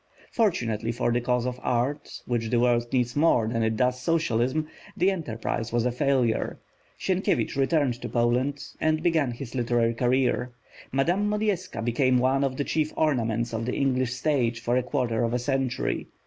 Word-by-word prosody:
Fortunately 115 - 0
for 120 0 0
the 120 +1 +1
cause 125 0 0
of 125 0 -3
art, 125 +4 -2
which 115 -2 -1
the 120 0 +2
world 120 -1 +2
needs 125 -1 0
more 145 -7 +3
than 115 0 -1
it 110 0 0
does 125 +1 +1
socialism, 155 -1 0 0.3
the 185 +3 +3
enterprise 115 -9 -3
was 120 0 +1
a 125 - +2
failure. 125 -3 0 0.4
Sienkiewicz 190 -5 0
returned 135 -3 +1
to - - -5
Poland, 125 +4 0 0.2
and 155 0 +1
began 160 -6 +2
his 120 0 -7
literary 120 -2 +1
career; 125 0 +1 0.4
Madame 175 +10 +1
Modjeska 205 - -1
became 130 +2 +2
one 130 +2 +2
of 130 -1 -1
the 145 - 0
chief 155 +1 -1
ornaments 115 -6 0
of 115 +1 -2
the 125 - -1
English 130 -2 +1
stage 130 -4 0
for 120 +1 0
a 130 - +3
quarter 125 -3 -1
of 115 +1 0
a - - +3
century. 135 0 -1
125 Hz, 175 wpm, -26 LUFS, 120-145 Hz, 0.4 s, more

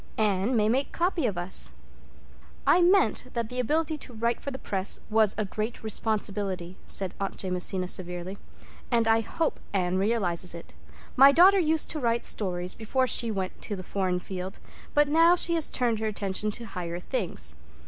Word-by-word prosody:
Anne 210 +2 +1
may 210 -1 +3
make 260 +5 +1
copy 340 -5 0
of 200 -5 -3
us." 175 - -1 0.9
"I 355 - +5
meant 355 - +3
that 230 -2 -2
the 250 - -4
ability 310 +5 0
to 255 - -10
write 235 +1 -1
for - - -4
the 265 - -5
Press 195 -6 -1
was 215 -2 +3
a 215 - 0
great 215 +4 -4
responsibility," 200 -4 -2
said 190 -2 -3
Aunt 195 -1 -3
Jamesina 185 0 0
severely, 180 +1 -2 0.5
"and 230 -2 +2
I 225 0 +4
hope 320 +8 -2
Anne 185 -1 +1
realizes, 190 -5 0
it. 165 - -11 0.4
My 275 +2 +8
daughter 375 +6 +6
used 320 -2 +1
to 310 - -3
write 235 -2 0
stories 180 -3 -1
before 255 +4 0
she 235 -1 +2
went 190 -3 -4
to 205 - -4
the 185 - -7
foreign 185 -1 -1
field, 185 +1 -6 0.4
but 295 0 +5
now 330 +4 +5
she 340 -1 +2
has 325 -2 +2
turned 235 -4 0
her 220 - -1
attention 200 0 0
to 235 - -7
higher 175 -4 -5
things. 170 - -3
215 Hz, 180 wpm, -27 LUFS, 185-255 Hz, 0.9 s, My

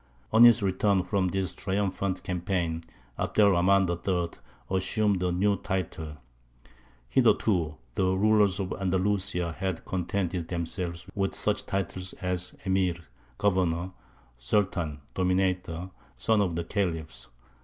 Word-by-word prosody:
On 115 +2 +9
his 120 -2 +6
return 95 0 +2
from 95 +1 0
this 95 +1 -1
triumphant 95 -1 -2
campaign, 90 -2 -2 0.4
Abd - - -3
er 100 -1 +7
Rahmān 95 +2 +4
III. 85 0 -1 0.4
assumed 100 0 +1
a 90 -1 +1
new 100 +3 +2
title. 90 -6 -4 0.9
Hitherto 80 - +2 0.2
the 95 - +1
rulers 105 -1 +4
of 95 -1 -2
Andalusia 95 -2 0
had 95 0 -3
contented 90 -2 -2
themselves 85 0 -3
with 95 -1 -1
such - - -1
titles 95 -1 -2
as 90 0 -3
Emīr 95 -3 +1 0.4
(governor), 90 -3 +1 0.5
Sultan 80 - 0
(dominator), 90 -1 0 0.3
"son 110 -2 +2
of 90 -4 0
the 85 - -1
Khalifs." 80 - -3
95 Hz, 120 wpm, -28 LUFS, 85-100 Hz, 0.9 s, On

